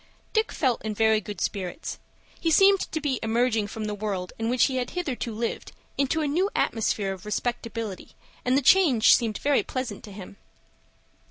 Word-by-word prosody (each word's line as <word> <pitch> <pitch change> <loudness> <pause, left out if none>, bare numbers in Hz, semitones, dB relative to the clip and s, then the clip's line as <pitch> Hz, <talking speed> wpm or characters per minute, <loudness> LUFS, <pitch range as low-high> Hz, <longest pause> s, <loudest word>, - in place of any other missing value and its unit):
Dick 440 +1 +1
felt 255 -5 0
in 215 -1 -3
very 220 0 +3
good 210 0 -7
spirits. 190 - -4 0.4
He 330 - 0
seemed 390 +4 +6
to 315 - -1
be 285 -5 -1
emerging 225 -1 +1
from 215 +1 -5
the 210 - -3
world 200 -3 -4
in 225 0 -1
which 250 0 +3
he 260 -2 +1
had 250 -1 -2
hitherto 280 -9 -3
lived, 225 +2 -4 0.2
into 280 +3 0
a 300 - 0
new 355 +8 +1
atmosphere 205 -3 0
of 190 - -11
respectability, 230 -1 -4 0.3
and 250 +2 +2
the 280 - +1
change 290 -9 +6
seemed 225 -4 -1
very 285 -1 +2
pleasant 255 -6 -5
to 210 - -11
him. 200 0 -10
230 Hz, 180 wpm, -26 LUFS, 210-280 Hz, 0.4 s, seemed